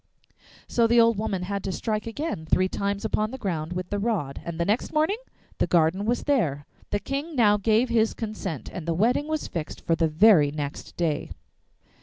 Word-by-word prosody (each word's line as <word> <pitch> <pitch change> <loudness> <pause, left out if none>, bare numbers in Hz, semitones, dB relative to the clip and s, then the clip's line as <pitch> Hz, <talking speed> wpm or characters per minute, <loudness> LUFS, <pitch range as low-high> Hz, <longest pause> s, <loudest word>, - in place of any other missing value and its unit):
So 235 -1 +3
the 235 +1 +4
old 230 -2 +4
woman 195 -4 -2
had 200 +1 -3
to 195 - -2
strike 215 +3 -2
again 230 - -4
three 185 +3 +3
times 200 +2 -2
upon 215 0 0
the 260 - -6
ground 175 -7 -3
with 180 0 -5
the 205 - 0
rod, 200 -11 -2
and 170 -1 -6
the 170 - +1
next 210 +6 0
morning 315 +8 +1 0.4
the - - +2
garden 170 +4 +2
was 240 +2 0
there. 160 - +1 0.2
The 205 - 0
King 280 +7 -4
now 210 -5 +5
gave 220 +4 +2
his 225 -2 +2
consent, 210 - -5
and 170 -3 -6
the 165 - 0
wedding 240 - +2
was 310 -1 -2
fixed 160 -3 -5
for 165 - +3
the 165 0 +2
very 160 -1 +5
next 145 -1 -6
day. 160 -4 -1
205 Hz, 200 wpm, -26 LUFS, 170-230 Hz, 0.4 s, now